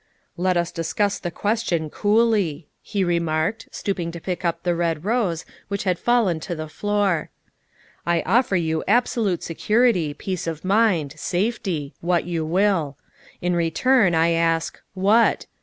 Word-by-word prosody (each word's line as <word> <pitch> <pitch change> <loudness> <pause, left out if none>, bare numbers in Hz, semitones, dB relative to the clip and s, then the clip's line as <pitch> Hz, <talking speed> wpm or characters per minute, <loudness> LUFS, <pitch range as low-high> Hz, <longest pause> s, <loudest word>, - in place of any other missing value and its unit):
" - - -43
Let 180 0 +1
us 170 0 0
discuss 195 +5 -1
the 175 - -3
question 175 -5 -1
coolly," 205 -8 +1
he 200 -2 -2
remarked, 170 +4 -1
stooping 175 -4 -3
to 170 - -6
pick 180 +2 -4
up 170 -1 -1
the 175 -1 +1
red 170 -1 -1
rose, 205 -7 0 0.2
which 200 0 -3
had 180 -3 0
fallen 230 -9 +2
to 175 +2 -5
the 155 0 -5
floor. 200 -1 0 0.4
" - - -40 0.3
I 170 -1 +2
offer 225 +2 +2
you 160 -2 0
absolute 225 -7 +1
security, 185 -3 +1
peace 185 +1 -4
of 165 +1 -4
mind, 190 -8 +2
safety 180 -7 -2
what 175 -1 +1
you 170 -2 -2
will. 165 -4 +1 0.5
In 180 0 +1
return 175 +4 +3
I 165 +1 +3
ask 165 0 0
what 205 +5 +3
175 Hz, 155 wpm, -23 LUFS, 165-205 Hz, 0.5 s, return